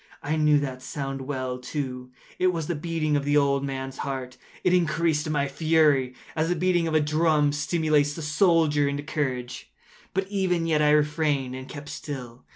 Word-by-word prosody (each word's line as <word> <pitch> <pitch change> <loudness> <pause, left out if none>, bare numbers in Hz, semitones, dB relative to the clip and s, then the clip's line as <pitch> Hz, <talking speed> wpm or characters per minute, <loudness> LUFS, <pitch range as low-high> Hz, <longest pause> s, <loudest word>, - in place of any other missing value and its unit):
I 150 +2 0
knew 150 -1 +4
that 130 -2 -4
sound 135 0 -4
well, 130 -2 -3
too. 125 -1 -5 0.3
It 185 - +3
was 165 -3 -3
the 175 - -2
beating 155 -1 -1
of 145 - +1
the 145 +1 +2
old 140 -1 +2
man’s 135 -1 -5
heart. 130 -2 -4 0.3
It 180 - +3
increased 160 -3 +1
my 145 -2 +1
fury, 145 -4 +2 0.2
as 160 +1 0
the 175 - +1
beating 175 -1 +1
of 160 - -1
a - - +6
drum 150 -1 +2
stimulates 150 -1 +1
the 165 - -6
soldier 150 -2 +3
into 140 +1 -2
courage. 130 -5 -3 0.4
But 190 0 0
even 185 -4 0
yet 155 -2 +2
I 150 - +4
refrained 150 -3 +1
and 130 0 -8
kept 145 -1 -8
still. 125 -5 -7
150 Hz, 180 wpm, -26 LUFS, 135-160 Hz, 0.4 s, a